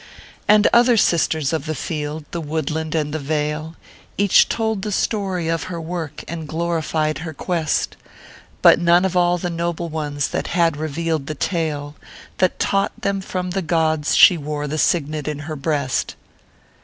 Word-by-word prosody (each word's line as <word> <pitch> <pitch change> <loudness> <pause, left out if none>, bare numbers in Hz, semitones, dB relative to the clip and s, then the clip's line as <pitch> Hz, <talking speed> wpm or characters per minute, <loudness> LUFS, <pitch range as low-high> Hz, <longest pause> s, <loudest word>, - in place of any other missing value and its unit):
And 210 0 +6
other 240 0 +5
sisters 160 -6 +2
of 160 -1 -2
the 155 - -2
field, 150 +1 -4
the 170 - -3
woodland, 160 +1 -3
and 150 -2 -1
the 155 - -2
vale, 150 +2 -2 0.4
Each 200 -1 +5
told 220 -3 -1
the 210 +1 -3
story 190 -4 -1
of 165 -1 -1
her 175 -2 -5
work, 165 -2 -5
and 165 -1 -5
glorified 160 -1 -1
her 160 -2 -6
quest; 165 -1 -1 0.7
But - - +7
none 175 +2 +4
of 185 -1 -1
all 175 0 +3
the 175 0 -3
noble 170 0 -2
ones 145 -2 -2
had - - -2
yet 165 -3 +3
revealed 155 -1 -2
the 155 - -4
talo 150 -3 -2 0.5
That 185 - +2
taught 195 0 0
them 200 -1 -1
from 180 -1 -4
the 195 +1 -1
gods 160 -3 +1
she 175 - +7
wore 150 0 -3
the 155 +2 -3
signet 155 -3 0
in 150 -1 -2
her 155 0 -5
breast. 140 -3 -1
160 Hz, 170 wpm, -21 LUFS, 150-175 Hz, 0.7 s, But